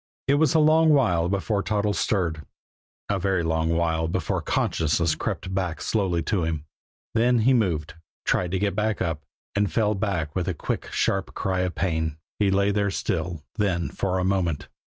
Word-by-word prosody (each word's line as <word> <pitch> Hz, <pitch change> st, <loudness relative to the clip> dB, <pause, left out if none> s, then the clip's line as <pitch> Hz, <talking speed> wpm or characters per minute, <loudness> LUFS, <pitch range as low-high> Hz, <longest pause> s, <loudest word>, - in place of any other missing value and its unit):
It 140 Hz, -, +4 dB
was 160 Hz, -, +3 dB
a -, -, +6 dB
long 155 Hz, +1 st, +5 dB
while 90 Hz, -, +3 dB
before 100 Hz, +1 st, 0 dB
Toddles 105 Hz, 0 st, 0 dB
stirred; 85 Hz, -7 st, 0 dB, 0.6 s
a 100 Hz, -1 st, 0 dB
very 95 Hz, -2 st, +1 dB
long 80 Hz, 0 st, 0 dB
while 80 Hz, -1 st, +1 dB
before 80 Hz, -, -1 dB
consciousness 80 Hz, 0 st, +1 dB
crept 80 Hz, -, -3 dB, 0.3 s
slowly 95 Hz, -6 st, 0 dB
back -, -, -8 dB
to 100 Hz, -6 st, +1 dB
him. 80 Hz, -2 st, -2 dB, 0.5 s
Then 120 Hz, +2 st, +3 dB
he 130 Hz, +4 st, +4 dB
moved, 85 Hz, -10 st, 0 dB, 0.3 s
tried 90 Hz, -, +1 dB
to -, -, +2 dB
get 100 Hz, +1 st, 0 dB, 0.2 s
up 80 Hz, -3 st, -1 dB, 0.3 s
and 100 Hz, -3 st, +1 dB
fell 105 Hz, +3 st, +2 dB
back 95 Hz, -8 st, -2 dB
with 90 Hz, -2 st, -1 dB
a 90 Hz, -, -1 dB
quick, -, -, -4 dB
sharp 95 Hz, 0 st, 0 dB
cry 95 Hz, -1 st, -1 dB
of 90 Hz, -1 st, -1 dB
pain. 80 Hz, -4 st, -1 dB, 0.2 s
He 100 Hz, -2 st, +3 dB
lay 100 Hz, +1 st, +2 dB, 0.2 s
still, 85 Hz, -4 st, -2 dB, 0.2 s
then, 90 Hz, -4 st, +1 dB
for 95 Hz, -1 st, -1 dB
a 90 Hz, -, 0 dB
moment. 90 Hz, -5 st, 0 dB
95 Hz, 175 wpm, -25 LUFS, 80-105 Hz, 0.6 s, a